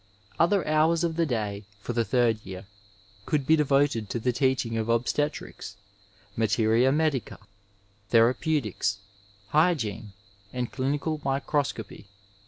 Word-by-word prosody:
Other 185 +3 +3
hours 160 +2 +3
of 165 -2 0
the 165 -1 +1
day 105 -5 -3
for 120 - -5
the 115 0 +1
third 115 -1 +1
year 95 0 -8 0.6
could 150 -4 0
be 160 - +5
de 150 - +2
voted 135 -6 +1
to 120 - -2
the 125 +2 +1
teaching 130 -3 0
of 110 0 -2
obstetrics, 125 +6 -2 0.6
materia 115 +3 +3
medica, 150 -4 0 0.7
thera 115 +1 +5
peutics, 125 - -1 0.5
hygiene 120 - +1 0.4
and 125 -1 -3
clinical 145 +3 -2
microscopy. 135 -5 -2
130 Hz, 125 wpm, -27 LUFS, 115-150 Hz, 0.7 s, be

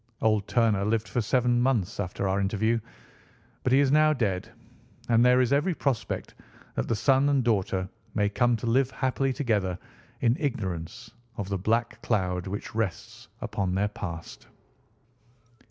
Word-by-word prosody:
Old 110 -2 +1
Turner 110 -5 +2
lived 110 +1 0
for 120 - -1
seven 120 +1 +2
months 120 -9 0
after 100 0 -2
our 95 +1 +1
interview, 110 +4 +1 0.8
but 130 - 0
he 135 - +6
is 140 -2 +3
now 155 +1 +5
dead; 105 -4 -2 0.6
and 115 0 +5
there 125 0 +5
is 130 +1 +2
every 160 +5 +2
prospect 135 -7 -2 0.4
that - - -2
the 115 - +1
son 135 +5 +3
and 140 -2 +2
daughter 95 -5 0 0.3
may 105 -2 +2
come 120 +3 +2
to 110 - -6
live 125 +3 +2
happily 135 0 0
together 105 - 0 0.4
in 120 0 +3
ignorance 110 - -4 0.3
of 100 -1 -4
the 100 - -1
black 115 +4 0
cloud 90 -2 -1
which 100 +2 -5
rests 110 -5 -4 0.2
upon 95 -2 -2
their 100 +2 +1
past. 85 -5 -7
115 Hz, 155 wpm, -27 LUFS, 100-125 Hz, 0.8 s, he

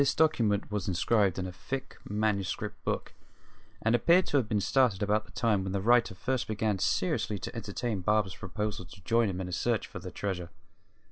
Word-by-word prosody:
This 140 - +3
document 115 -11 +2
was 105 -3 -2
inscribed 95 +2 +2
in 95 - -2
a 90 - -5
thick 130 +9 -6
manuscript 105 -2 -1
book, - - -2 0.7
and 110 - +3
appeared 170 +8 +5
to 145 - +1
have 120 -6 0
been 105 - +2
started 115 -2 +2
about 105 +1 +1
the - - -17
time 110 -4 +1
when 95 0 -3
the 100 - 0
writer 115 -1 +3
first 130 +6 -1
began 110 -2 0
seriously 105 +3 0
to 95 - -7
entertain 110 -1 -3
Barber's 105 0 +1
proposal 105 0 -4
to 95 +3 -14
join 115 +1 +3
him 95 -1 -3
in 95 - -3
a - - -6
search 110 +6 0
for - - -8
the - - -7
treasure. 90 -4 -4
105 Hz, 200 wpm, -30 LUFS, 95-115 Hz, 0.7 s, appeared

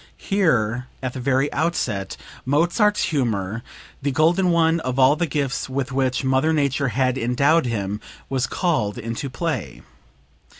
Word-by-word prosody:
Here, 125 - +1 0.2
at 130 -1 -2
the - - -6
very 135 +2 +1
outset, 130 - -1 0.3
Mozart's 175 - +2
humor, 115 - -1 0.4
the 140 - 0
golden 170 +7 +3
one 165 -1 +3
of 130 -4 -3
all 135 +2 +5
the 170 +1 -1
gifts 140 -3 -2
with 135 0 -2
which 130 0 0
Mother 130 +4 +2
Nature 140 -2 +1
had 130 +2 0
endowed 140 +6 +2
him, 105 -2 -3 0.3
was 130 -2 -1
called 120 - 0
into 115 +4 -4
play. 125 - -4
135 Hz, 140 wpm, -22 LUFS, 120-160 Hz, 0.4 s, all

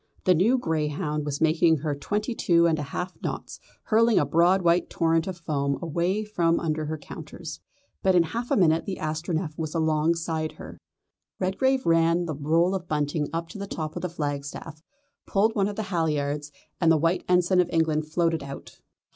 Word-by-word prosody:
The 185 - +5
new 205 +10 +3
greyhound 150 - -2
was 145 -1 -3
making 160 +1 +4
her 150 +1 -2
twenty 210 - -2
two 170 -6 +3
and 160 -2 +2
a 145 -1 -5
half 180 +1 -4
knots, - - -5 0.2
hurling 230 0 +3
a - - +4
broad 175 +6 +3
white 170 +1 +3
torrent 165 0 +1
of 185 -2 -4
foam 140 -4 -1
away 175 +5 -1
from 170 -6 +1
under 155 -1 -2
her 155 +1 -3
counters. 155 0 -9 0.4
But 190 -1 +3
in 175 - +6
half 235 +8 -4
a - - +2
minute 165 -2 +3
the 190 - -3
Astronef 155 +1 -2
was 155 0 -4
alongside 160 0 0
her. - - -11 0.6
Redgrave 260 +8 +1
ran 165 +1 +3
the 160 - -3
roll 165 +6 +2
of 185 -2 -4
bunting 150 0 -1
up 165 +1 -3
to 210 - -9
the 200 - -5
top 155 -4 -5
of - - -4
the 180 - -2
flagstaff, 145 0 -5 0.5
pulled 215 +3 +2
one 200 -2 +1
of 205 - -4
the 220 - -2
halliards, 150 -3 -1 0.3
and 165 -1 +4
the 160 - +5
White 165 +4 +1
Ensign 180 +1 +3
of 180 -1 +3
England 155 -2 +1
floated 165 0 0
out. 140 0 -9
165 Hz, 190 wpm, -26 LUFS, 155-180 Hz, 0.6 s, in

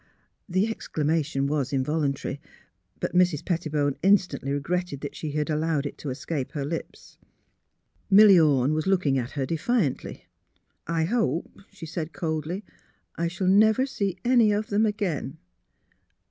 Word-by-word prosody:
" - - -42
The 195 - +4
exclamation 155 -8 -1
was 140 -2 -1
involuntary; 140 0 -1 0.6
but - - -3
Mrs. 180 -4 +2
Pet 170 -2 0
tibone 145 -4 -1
instantly 180 -8 +2
regretted 145 +1 -2
that 145 - -6
she 150 -2 -5
had 150 0 -1
allowed 155 -2 0
it 145 - -6
to 145 - -5
escape 135 +2 -4
her 145 -3 -3
lips. 165 +3 -7 0.9
Milly 200 -2 +8
Ome 145 -3 +3
was 155 +2 -1
looking 175 -9 +2
at 125 +1 -5
her 135 - 0
defiantly. 165 - -1 0.3
'' - - -45
I 165 0 0
hope," 170 - 0 0.2
she 195 -4 -10
said, 160 0 -5
coldly, 160 +4 -3 0.3
" - - -45
I 170 - -1
shall 185 +3 -3
never 215 +6 +5
see 200 -8 -3
any 240 -4 +5
of 210 +1 -1
them 210 +2 +2
again. 185 -9 -3
160 Hz, 155 wpm, -26 LUFS, 145-190 Hz, 0.9 s, Milly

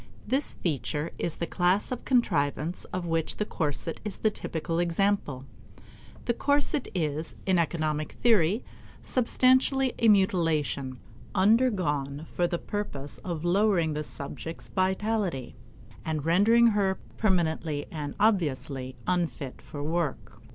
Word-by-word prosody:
This 265 +6 +1
feature 150 0 -2
is 170 - -1
the 170 - -2
class 180 +6 +1
of 250 - -4
contrivances 170 - +1
of 180 -1 -4
which 165 -1 -1
the 210 - 0
corset 160 -3 -2
is 210 -2 -4
the 215 - +2
typical 165 -3 -3
example. 175 -6 0 0.8
The 235 - +2
corset 285 +2 +1
is, 155 -2 -2
in 185 -2 +3
economic 155 -2 -1
theory, 210 -2 +3 0.4
substantially 260 +1 +3
a 230 - +4
mutilation, 165 -9 +2 0.4
undergone 185 - +2
for 175 - +2
the 175 0 -1
purpose 160 -9 -5
of 170 -3 -4
lowering 180 -3 +3
the 150 0 -2
subject's 155 +3 -7
vitality 190 - -1 0.5
and 155 -2 -2
rendering 210 +8 +5
her 195 -2 +1 0.2
permanently 160 -7 +1
and 150 -3 -5
obviously 145 - 0
unfit 170 -7 -2
for 145 -1 -7
work. 160 -2 -2
175 Hz, 125 wpm, -28 LUFS, 150-205 Hz, 0.8 s, rendering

